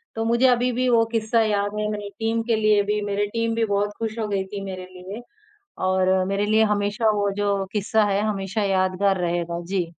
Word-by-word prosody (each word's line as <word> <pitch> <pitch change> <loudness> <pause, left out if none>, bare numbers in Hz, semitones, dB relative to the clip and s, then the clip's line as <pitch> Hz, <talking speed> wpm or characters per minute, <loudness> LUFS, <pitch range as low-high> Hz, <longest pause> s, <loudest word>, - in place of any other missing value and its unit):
तो 225 - -1
मुझे 235 +3 +2
अभी 245 0 +2
भी 255 +1 0
वो 230 -1 +4
किस्सा 225 +1 +2
याद 205 -1 0
है, 210 - -1
मेरी 205 -1 -5
टीम 225 +1 0
के 230 - +3
लिए 215 -1 +3
भी। 210 +1 -1
मेरी 205 +1 0
टीम 230 +1 -1
भी 230 0 +1
बहुत 205 0 0
खुश 225 0 -3
हो 215 - -1
गई 195 -2 -1
थी 200 +1 -7
मेरे 185 -1 -6
लिए 185 +5 -9 0.6
और 185 0 +2
मेरे 200 +1 0
लिए 220 +1 +4
हमेशा 205 +2 0
वो 205 -1 0
जो 200 -1 0
किस्सा 210 +1 +2
है, 200 0 +1
हमेशा 205 0 -2
यादगार 190 0 +1
रहेगा। 170 0 -2
जी। 185 -1 -1
205 Hz, 210 wpm, -23 LUFS, 195-225 Hz, 0.6 s, वो